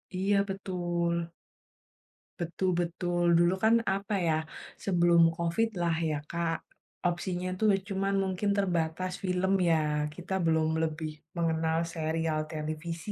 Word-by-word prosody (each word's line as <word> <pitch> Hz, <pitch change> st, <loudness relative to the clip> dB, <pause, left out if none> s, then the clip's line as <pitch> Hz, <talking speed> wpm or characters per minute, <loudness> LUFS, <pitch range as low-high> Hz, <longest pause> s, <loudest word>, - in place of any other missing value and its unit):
Iya 195 Hz, +2 st, +2 dB
betul. 175 Hz, -3 st, -1 dB, 1.1 s
Betul 175 Hz, +2 st, -1 dB
betul. 175 Hz, 0 st, -1 dB
Dulu 175 Hz, +1 st, +4 dB
kan 220 Hz, +1 st, +5 dB, 0.2 s
apa 200 Hz, +1 st, -2 dB
ya, -, -, +3 dB, 0.5 s
sebelum 175 Hz, -3 st, +4 dB
COVID 170 Hz, +7 st, +1 dB
lah 170 Hz, -1 st, +2 dB
ya 150 Hz, -, 0 dB
Kak, 170 Hz, -1 st, -1 dB, 0.5 s
opsinya 175 Hz, +1 st, -2 dB
itu 185 Hz, +4 st, -4 dB, 0.3 s
cuman 195 Hz, 0 st, 0 dB
mungkin 190 Hz, +2 st, -1 dB
terbatas 180 Hz, -1 st, 0 dB
film 185 Hz, +1 st, +1 dB, 0.2 s
ya 150 Hz, -2 st, +1 dB
kita 180 Hz, +2 st, -6 dB
belum 160 Hz, -1 st, +3 dB, 0.2 s
lebih 155 Hz, 0 st, -2 dB, 0.3 s
mengenal 160 Hz, -1 st, +1 dB, 0.2 s
serial 160 Hz, -1 st, -1 dB
televisi. 160 Hz, +4 st, -4 dB
170 Hz, 120 wpm, -29 LUFS, 160-185 Hz, 1.1 s, kan